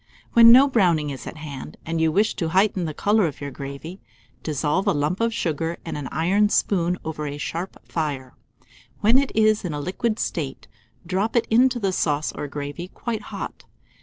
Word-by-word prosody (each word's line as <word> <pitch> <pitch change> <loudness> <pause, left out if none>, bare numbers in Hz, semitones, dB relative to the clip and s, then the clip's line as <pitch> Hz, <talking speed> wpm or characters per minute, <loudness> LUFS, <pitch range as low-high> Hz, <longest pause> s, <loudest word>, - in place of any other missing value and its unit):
When 230 0 +9
no 260 +4 +8
browning 175 - +2
is 135 - -8
at - - -7
hand, 150 -1 -8
and 165 0 -1
you 160 -1 +3
wish 210 +6 +2
to 165 - -1
heighten 190 0 +2
the 155 - -3
colour 205 -2 +2
of 150 - -7
your 140 -1 -5
gravy, 140 +7 -8 0.4
dissolve 150 +4 -1
a - - +4
lump 150 +5 -1
of 230 0 +2
sugar 165 -5 -2
in 165 - -4
an 145 -3 -4
iron 195 +6 +2
spoon 180 -4 +1
over 155 -1 -4
a 145 0 -5
sharp 170 +5 -4
fire; 140 -5 -3 0.7
when 225 +5 +5
it 275 - -1
is 215 -1 +3
in 175 -4 -3
a 145 - -3
liquid 215 +8 -2
state, 145 -11 -4 0.4
drop 195 +7 -1
it 235 - +3
into 250 +2 +4
the 200 -5 0
sauce 150 -3 0
or 145 - -5
gravy 145 +4 -6
quite 225 +3 -4
hot. - - -7
170 Hz, 190 wpm, -23 LUFS, 150-210 Hz, 0.7 s, When